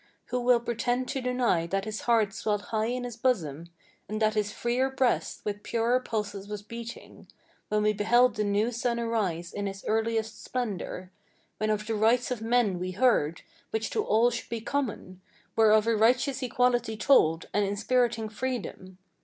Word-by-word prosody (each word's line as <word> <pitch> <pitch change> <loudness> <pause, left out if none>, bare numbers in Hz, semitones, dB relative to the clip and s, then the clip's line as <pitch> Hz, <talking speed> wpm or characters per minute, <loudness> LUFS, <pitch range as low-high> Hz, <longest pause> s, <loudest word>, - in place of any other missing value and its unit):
Who 250 - 0
will 245 0 +4
pretend 245 +2 -1
to 270 - -2
deny 245 -9 +1
that 195 +3 -1
his 215 0 -4
heart 225 -4 +2
swelled 210 -1 -1
high 220 0 +1
in 250 +1 -2
his 245 -2 -5
bosom, 170 - -1 0.4
And 215 +1 -3
that 215 -1 +2
his 210 -2 0
freer 245 +4 0
breast 265 -2 0
with 205 -1 -3
purer 235 +3 +1
pulses 205 -5 -4
was 210 -1 -6
beating; 235 +2 -9 0.4
When 210 0 +1
we 210 0 +3
beheld 240 +5 +4
the 210 - 0
new 205 +3 +1
sun 235 0 -1
arise 195 -8 -2
in 205 0 -3
his 195 0 -7
earliest 225 0 -1
splendor, 200 -6 -4 0.5
When 215 - 0
of 210 0 0
the 225 - -2
rights 230 +4 +2
of 245 -3 -2
men 225 -5 +2
we 185 +1 -3
heard, 185 -8 +2 0.3
which 220 0 -2
to 435 - 0
all 235 - +3
should 240 - -5
be 230 - -3
common, 220 -8 -3 0.3
Were 220 -1 +5
of 215 0 +5
a 230 0 +2
righteous 250 +5 +2
equality 245 -3 +1
told, 165 - +4
and 205 - +2
inspiriting 220 +3 +1
freedom? 215 -5 -5
225 Hz, 180 wpm, -28 LUFS, 205-245 Hz, 0.5 s, Were